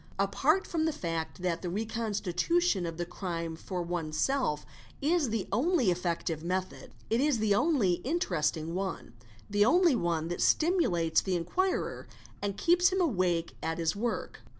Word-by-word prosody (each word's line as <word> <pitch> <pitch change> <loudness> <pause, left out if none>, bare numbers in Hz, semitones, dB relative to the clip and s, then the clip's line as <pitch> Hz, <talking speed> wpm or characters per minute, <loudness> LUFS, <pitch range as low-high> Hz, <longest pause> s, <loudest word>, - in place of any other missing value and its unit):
Apart 275 - +2
from 320 -2 -1
the 320 - +2
fact 165 - -4
that 170 -2 -1
the 180 - -3
reconstitution 215 - 0
of 165 -1 -6
the 175 - -2
crime 170 -2 -4
for 180 +2 -4
oneself 170 - -1 0.3
is 305 -2 +2
the 220 -3 -2
only 260 - +2
effective 170 -2 -2
method, 185 +2 -3 0.2
it 230 +3 +3
is 290 -3 +2
the 215 -2 +2
only 205 - +2
interesting 165 - -1
one, 185 -10 -4 0.3
the 205 0 +3
only 340 - +5
one 170 -5 0
that 175 - -3
stimulates 180 - +3
the 190 -2 -1
inquirer 360 - -1 0.3
and 200 -1 -2
keeps 355 +1 +4
him 380 - -1
awake 180 - +1
at 165 0 -2
1is 165 0 0
work. 230 +3 -3
195 Hz, 150 wpm, -30 LUFS, 170-275 Hz, 0.3 s, only